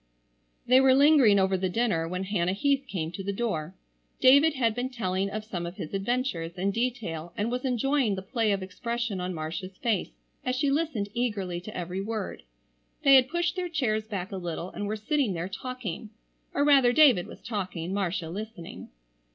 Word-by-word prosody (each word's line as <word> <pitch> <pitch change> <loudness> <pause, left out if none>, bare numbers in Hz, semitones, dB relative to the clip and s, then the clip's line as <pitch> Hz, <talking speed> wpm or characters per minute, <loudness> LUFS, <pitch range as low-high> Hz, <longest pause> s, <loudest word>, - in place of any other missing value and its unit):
They 255 +2 +6
were 265 -1 +6
lingering 275 -7 +6
over 190 0 +3
the 185 0 -1
dinner 180 -6 0
when 180 +2 -3
Hannah 185 -2 0
Heath 275 +6 +1
came 165 -8 -3
to 195 +2 -6
the 200 - -2
door. 195 -6 -3 0.4
David 280 +4 +6
had 230 -4 +2
been 245 +3 -2
telling 195 -5 -1
of 215 +2 -5
some 175 -5 -4
of 175 - -7
his 155 - -7
adventures 195 -5 -2
in 195 +2 0
detail 205 -9 -3
and 215 +3 -1
was 250 +2 -2
enjoying 255 -2 +1
the 190 - -6
play 225 +1 0
of 195 -1 -1
expression 235 +1 -3
on 180 +1 -2
Marcia's 180 +4 -5
face 220 -6 0 0.3
as 255 0 -1
she 275 +2 +1
listened 280 -9 -1
eagerly 200 -7 -2
to 215 +4 -8
every 180 +2 -3
word. 215 -1 -4 0.6
They 275 - +7
had 260 -1 +7
pushed 345 +2 0
their 360 -1 -2
chairs 220 -9 -1
back 200 -2 -4
a 195 - -4
little 175 0 -5
and 205 - -4
were 215 - -1
sitting 225 +1 0
there 170 +1 -3
talking,—or 230 +4 -5
rather 270 -4 +6
David 250 - +6
was - - -11
talking, 185 -5 -4
Marcia 180 -4 -2
listening. 210 -2 -8
210 Hz, 185 wpm, -27 LUFS, 185-255 Hz, 0.6 s, They